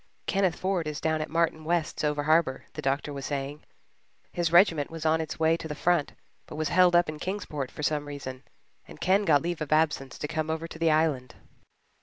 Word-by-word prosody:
"Kenneth 190 -4 +1
Ford 185 -4 -1
is 150 -1 -4
down 160 -1 0
at 155 - -4
Martin 165 -1 0
West's 170 0 -1
over 150 -1 0
harbour," 155 -3 +2
the - - -6
doctor 140 +2 -1
was 140 -1 -5
saying. 145 +1 -4 0.7
"His 170 -2 -1
regiment 170 -5 +4
was 165 -1 -7
on 160 +1 +3
its 160 -1 -6
way 160 0 +4
to 165 - -6
the 150 - -5
front 170 -2 +1 0.3
but - - -9
was 155 -1 -1
held 180 +1 +5
up 175 0 +5
in 155 0 -6
Kingsport 170 -8 -4
for 150 - -8
some 150 -1 0
reason, 130 -3 -7 0.5
and 75 - -13
Ken 195 +2 +2
got 150 -4 +4
leave 175 -1 -3
of 155 - -4
absence 155 -4 +1
to 150 - -4
come 155 +1 -2
over 160 +1 -2
to 160 - -11
the 165 -1 +3
Island." 155 -6 +1
155 Hz, 215 wpm, -27 LUFS, 145-170 Hz, 0.7 s, held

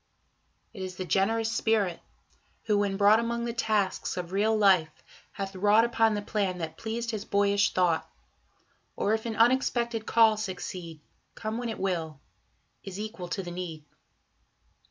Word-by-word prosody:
It 200 - -8
is 185 -1 -5
the 185 - -5
generous 225 +5 +1
Spirit, 215 -6 +1 0.6
who, 210 -2 +2
when 200 -1 0
brought 205 +2 +6
Among 235 0 -2
the 235 - -3
tasks 215 -6 -1
of 175 -1 -4
real 215 +3 +2
life, 190 -6 +4 0.4
hath 195 -1 -5
wrought 205 +4 +4
Upon 225 -2 +2
the 205 - -3
plan 200 -4 -1
that 160 -2 -5
pleased 230 +3 -4
his 215 -2 -4
boyish 200 0 +2
thought... 175 -3 +1 0.9
Or 210 - +1
if 220 +1 -1
an 225 - -3
unexpected 235 -1 +2
call 225 -2 +5
succeed, 180 -5 -6 0.3
Come 220 +1 -4
when 240 -1 -3
it 225 - -4
will, 165 -6 -2 0.6
is 195 0 -7
equal 210 -4 -6
to 190 +2 -3
the 175 - -7
need. 170 -4 -6
205 Hz, 155 wpm, -28 LUFS, 185-225 Hz, 0.9 s, brought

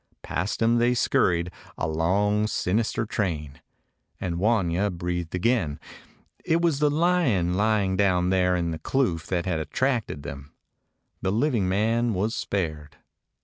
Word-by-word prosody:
Past 100 +6 -2
him 115 +1 +3
they 120 +1 +3
scurried, 90 -6 +1 0.3
a 80 - -1
long 100 +7 +1
sinister 110 +2 0
train, 80 -10 -3 0.6
and 85 -2 -3
Wanya 100 -2 +1
breathed 90 -1 -3
again. 90 -7 0 0.6
It 165 - +2
was 165 -5 +1
the 150 0 +3
lion 145 - +2
lying 100 -1 +1
down 90 -2 +2
there 90 -1 +3
in 85 -1 -1
the 80 - -5
kloof 85 - 0
that 90 -2 -1
had 90 -4 -1
attracted 105 - -1
them. 70 0 -8 0.7
The 95 - 0
living 115 -4 +1
man 115 +3 +1
was 105 +5 0
spared. 80 -10 -3
95 Hz, 140 wpm, -25 LUFS, 85-115 Hz, 0.7 s, him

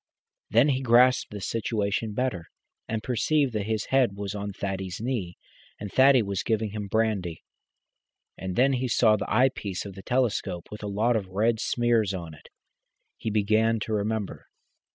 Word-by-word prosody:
Then 120 +7 +4
he 130 -1 +1
grasped 125 +1 +4
the 105 -1 -7
situation 110 0 -2
better, 125 -10 -2 0.4
and 110 -1 -3
perceived 130 +2 +1
that 105 -2 -2
his 110 -1 -1
head 125 -7 +3
was 100 -1 -4
on 100 0 -4
Thaddy's 95 -2 -4
knee, 110 -8 -3 0.4
and 105 -2 -6
Thaddy 130 -2 +5
was 100 -2 -2
giving 110 -2 -1
him 105 -1 -5
brandy. 100 -6 -1 0.9
And 95 0 -5
then 135 +2 +4
he 130 0 -1
saw 110 -2 +4
the 105 - -4
eyepiece 115 -8 +1
of 100 - -7
the 95 - -10
telescope 120 -8 -1
with 105 - -8
a 105 - -4
lot 110 +4 +1
of 100 -4 -1
red 110 +4 +1
smears 115 -5 +1
on 85 -3 -7
it. 75 - -16 0.7
He - - -3
began 110 +2 +2
to 110 - -3
remember. 105 0 -2
110 Hz, 170 wpm, -26 LUFS, 100-120 Hz, 0.9 s, Thaddy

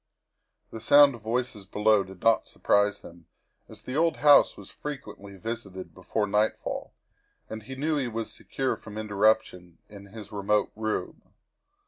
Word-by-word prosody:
The 110 - -8
sound 145 +2 +7
of 120 - -11
voices 115 -3 -3
below 105 0 +3
did 95 -1 -14
not 115 -2 +3
surprise 100 0 +1
him, 85 -1 -14 0.4
as - - -13
the 130 - -6
old 165 +2 +2
house 145 -1 +5
was - - -12
frequently 105 -9 -8
visited 100 -3 -6
before 100 +3 -2
nightfall 105 +2 -1 0.6
and 110 0 -6
he 130 +5 -9
knew 150 +3 -1
he 135 -3 -1
was 115 -1 -4
secure 135 -1 -3
from 110 -1 -11
interruption 105 -4 0
in 100 -1 -12
his 105 0 -11
remote 105 0 0
room. 110 0 -3
110 Hz, 150 wpm, -27 LUFS, 100-120 Hz, 0.6 s, sound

